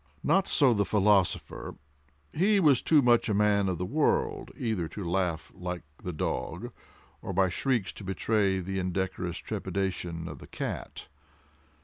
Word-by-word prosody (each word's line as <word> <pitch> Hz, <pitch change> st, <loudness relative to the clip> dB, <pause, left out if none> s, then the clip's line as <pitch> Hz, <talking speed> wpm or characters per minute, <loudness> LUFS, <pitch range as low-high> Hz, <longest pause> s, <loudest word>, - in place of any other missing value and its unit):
Not 190 Hz, +5 st, +3 dB
so 135 Hz, -6 st, +5 dB
the 100 Hz, -2 st, +2 dB
philosopher; 100 Hz, -2 st, +1 dB, 0.6 s
he 200 Hz, +5 st, +3 dB
was 145 Hz, -8 st, +5 dB
too 150 Hz, -3 st, +4 dB
much 120 Hz, -2 st, +4 dB
a 105 Hz, -, +1 dB
man 100 Hz, -1 st, +3 dB
of 90 Hz, -, -1 dB
the 90 Hz, -, -2 dB
world 145 Hz, +10 st, 0 dB
either 110 Hz, -9 st, -1 dB
to 90 Hz, +3 st, -6 dB
laugh 85 Hz, -2 st, -1 dB
like 90 Hz, -1 st, -5 dB, 0.2 s
the 90 Hz, -, -3 dB
dog, 75 Hz, -, -3 dB, 0.5 s
or 95 Hz, -, -5 dB
by 95 Hz, 0 st, +3 dB
shrieks 120 Hz, +2 st, 0 dB
to -, -, -10 dB
betray 95 Hz, 0 st, +1 dB
the 95 Hz, +2 st, -3 dB
indecorous 90 Hz, -1 st, -2 dB
trepidation 90 Hz, -4 st, -3 dB
of -, -, -8 dB
the -, -, -12 dB
cat. -, -, -5 dB
95 Hz, 150 wpm, -29 LUFS, 90-115 Hz, 0.6 s, so